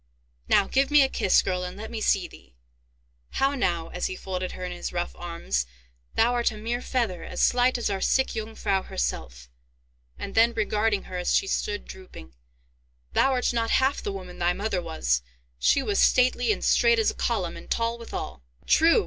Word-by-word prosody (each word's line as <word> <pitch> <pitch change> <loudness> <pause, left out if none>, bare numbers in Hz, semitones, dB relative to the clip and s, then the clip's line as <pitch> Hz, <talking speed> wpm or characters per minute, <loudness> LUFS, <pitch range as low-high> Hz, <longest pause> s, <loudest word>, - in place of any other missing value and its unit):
Now, 200 - +5
give 270 +1 +2
me 295 -1 +6
a 265 - +1
kiss, 190 - +3
girl, 180 -1 -1
and 180 +1 -6
let 220 +1 -7
me 225 -2 -4
see 190 -4 +2
thee! 65 -2 -17 0.8
How 275 +1 +2
now!" 170 -11 -1
as 180 - -2
he 185 - -5
folded 185 -1 -4
her 185 - -6
in 180 - -5
his 175 - -5
rough 175 0 -3
arms; 170 - -3 0.5
"thou 235 +2 +3
art 240 -1 +2
a 215 - -9
mere 235 +3 -3
feather, 230 -10 -1
as - - -6
slight 250 +1 +3
as 240 - -1
our 195 -1 -2
sick 265 - +2
Jungfrau 215 -3 -2
herself." - - -4 0.7
And 195 - -6
then, 230 +1 +4
regarding 215 -1 0
her, 180 - -6
as 180 - +1
she - - +3
stood 205 +1 -2
drooping, 65 - -12 0.8
"Thou - - +4
art 250 -2 +1
not 230 -1 0
half 265 +2 +2
the 205 - -3
woman 185 -2 -8
thy 175 0 +2
mother 200 -1 -2
was—she 60 - -1
was 410 -1 0
stately 250 - +4
and - - -2
straight 470 0 +4
as 445 - +2
a - - -11
column, - - -1
and - - -11
tall 230 0 -1
withal." 230 - -6 0.2
"True!" 330 +7 +5
205 Hz, 190 wpm, -26 LUFS, 175-240 Hz, 0.8 s, me